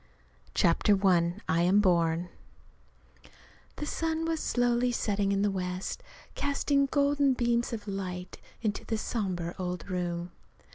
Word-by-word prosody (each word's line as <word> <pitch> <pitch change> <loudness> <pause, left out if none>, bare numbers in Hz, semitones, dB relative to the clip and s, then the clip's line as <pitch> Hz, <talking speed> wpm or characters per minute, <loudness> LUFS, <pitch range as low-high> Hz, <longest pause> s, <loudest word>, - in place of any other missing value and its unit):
CHAPTER 185 +4 +4
I 175 -2 +4
I 165 +1 +2
AM 185 +4 +4
BORN 170 -3 +2 1.5
The 295 - -4
sun 325 +1 -1
was 325 -1 -1
slowly 245 -1 +1
setting 205 -4 0
in 200 0 +1
the 205 - +2
west, 185 - -3 0.3
casting 280 0 +1
golden 285 -1 +3
beams 240 -1 +1
of 220 -2 -5
light 185 -2 -5 0.2
into 210 -2 -1
the 225 - -2
somber 185 -7 -2
old 180 -1 -4
room. 175 -1 -2
200 Hz, 130 wpm, -29 LUFS, 180-245 Hz, 1.5 s, CHAPTER